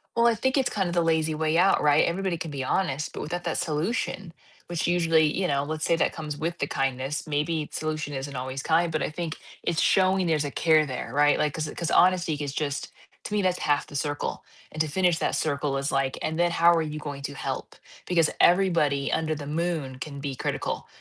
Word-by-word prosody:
Well, 235 0 +4
I 230 - +4
think 260 +5 0
it's 260 -2 +2
kind 190 -4 -1
of - - -3
the 170 - +3
lazy 160 -1 +1
way 160 +1 +1
out, 190 +2 +4
right? 150 0 +5
Everybody 185 +1 -1
can 160 -2 -5
be 135 -2 -3
honest, 155 -4 -1
but - - -5
without 175 +4 -4
that - - -1
solution, 170 +2 -2 0.3
which 170 -2 -2
usually 165 -2 +3
you 185 -1 0
know, 140 -2 +1
let's 155 +1 -3
say 170 - +3
that - - +1
comes 150 -2 -6
with 170 +3 -3
the 140 - 0
kindness, 135 +2 -2
maybe 150 +1 -1
solution 155 -2 -3
isn't 135 +1 -5
always 130 +1 -4
kind, 165 +3 +2
but 155 - -1
I - - -1
think 160 0 -5 0.3
it's 170 -1 0
showing 190 -1 +3
there's 155 -2 +2
a 140 - -3
care 155 0 +3
there, 130 -3 -5
right? 145 0 +4
Like, 150 -2 +1
'cause 155 -2 -3
'cause 170 -1 -2
honesty 180 -3 +4
is 145 -2 -4
just 145 -1 -3 0.3
to 210 - -6
me, 210 - +2
that's 180 -1 +1
half 145 -1 +1
the 145 - -12
circle, 145 +1 -2 0.3
and 155 - -2
to 155 - +1
finish 175 +1 +1
that - - 0
circle 140 -2 -1
is 140 +1 -1
like, 135 -1 0
"And 160 +1 -2
then 175 0 +4
how 170 0 +5
are 165 - +2
you 155 -1 -4
going 145 -2 -6
to 140 0 -5
help?" - - -5 0.3
Because 165 -3 +3
everybody 170 -7 +3
under 155 -1 0
the 145 -1 -7
moon 155 -4 -2
can 140 -2 -6
be 140 -2 -4
critical - - -3
155 Hz, 230 wpm, -26 LUFS, 145-170 Hz, 0.3 s, right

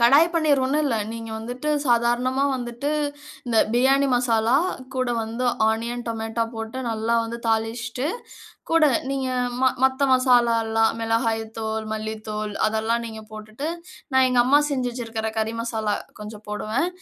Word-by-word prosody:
கடாய் 275 +7 +7
பன்னீர் 305 -4 +3
ஒண்ணும் 290 +4 +1
இல்ல, 245 -5 +1 0.2
நீங்க 230 -1 -7
வந்துட்டு 245 +6 -5 0.2
சாதாரணமா 240 +2 +2
வந்துட்டு, 245 +3 -4 0.6
இந்த 230 -2 +2
பிரியாணி 270 +3 +4
மசாலா, 240 0 +3 0.4
கூட 255 -1 0
வந்து 230 +3 -3 0.2
ஆனியன் 235 +2 -3
டொமேட்டோ 225 0 -2
போட்டு 225 +3 -5
நல்லா 225 +1 0
வந்து 230 +1 -5
தாளிச்சிட்டு, 225 +3 -1 0.6
கூட 330 -2 +5 0.2
நீங்க 270 -1 -1 0.3
ம - - +3 0.2
மத்த 265 +1 +3
மசாலா 245 -2 +4
எல்லாம், 225 0 +2
மிளகாய் 225 0 +1 0.2
தூள் 220 0 -2
மல்லித்தூள், 215 -1 -4 0.2
அதெல்லாம் 220 +2 0
நீங்க 220 -1 -7
போட்டுட்டு, 215 +6 -7 0.5
நான் 260 0 +5
எங்க 250 -1 +1
அம்மா 275 +4 +5
செஞ்சு 255 -3 0
வச்சிருக்கிற 225 -2 -4
கறி 220 0 0
மசாலா 220 -3 -1 0.3
கொஞ்சம் 210 0 -9
போடுவேன். 215 +9 -1
235 Hz, 140 wpm, -23 LUFS, 220-255 Hz, 0.6 s, கடாய்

